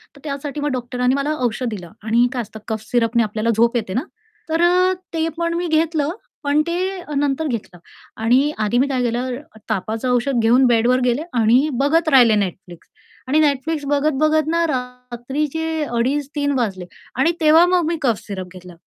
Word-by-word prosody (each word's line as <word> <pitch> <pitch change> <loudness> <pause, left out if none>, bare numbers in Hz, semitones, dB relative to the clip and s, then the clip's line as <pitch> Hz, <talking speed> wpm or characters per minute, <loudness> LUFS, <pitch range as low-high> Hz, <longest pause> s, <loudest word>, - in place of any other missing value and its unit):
तर - - -15
त्यासाठी 285 0 -5
मग 295 - -1
डॉक्टरांनी 250 0 -1
मला 280 +2 -1
औषध 240 +2 -2
दिलं 180 -6 -7
आणि 235 +2 +3
काय 250 - -1
असतं 220 0 -10
कफ 220 -1 -3
सिरपने 235 -1 +2
आपल्याला 215 +2 -2
झोप 235 +2 +3
येते 215 -5 -2
ना, 250 - 0 0.5
तर 325 +1 +1
अ, 365 +2 +4 0.2
ते 325 0 0
पण 335 0 -1
मी 345 +1 -2
घेतलं 315 -1 +1 0.3
पण 290 +1 +2
ते 365 +2 -2
नंतर 285 +2 0
घेतलं 215 -8 -5 0.4
आणि 255 +6 +3
आधी 215 +2 +1
मी 265 +3 +3
काय 260 -2 -1
केलं, 245 +2 -1 0.3
तापाचं 220 +4 -2
औषध 250 +1 +1
घेऊन 245 +4 +5
बेडवर 240 +2 +3
गेले 250 +3 +1
आणि 240 +5 +3
बघत 315 +3 +2
राहिले 245 -6 +6
Netflix 175 -1 -11 0.4
आणि 295 +4 +3
Netflix 295 +1 0
बघत-बघत 305 +1 +2
ना 335 0 +2
रात्रीचे 265 +5 -3
2.30-3.00 285 +3 -1
वाजले 195 -7 -2 0.3
आणि 270 +7 +3
तेव्हा 320 +2 +6
मग 355 -2 +2
मी 340 - 0
कफ 235 -7 +1
सिरप 185 -2 -6
घेतला. 180 -1 -12
260 Hz, 170 wpm, -20 LUFS, 235-305 Hz, 0.5 s, राहिले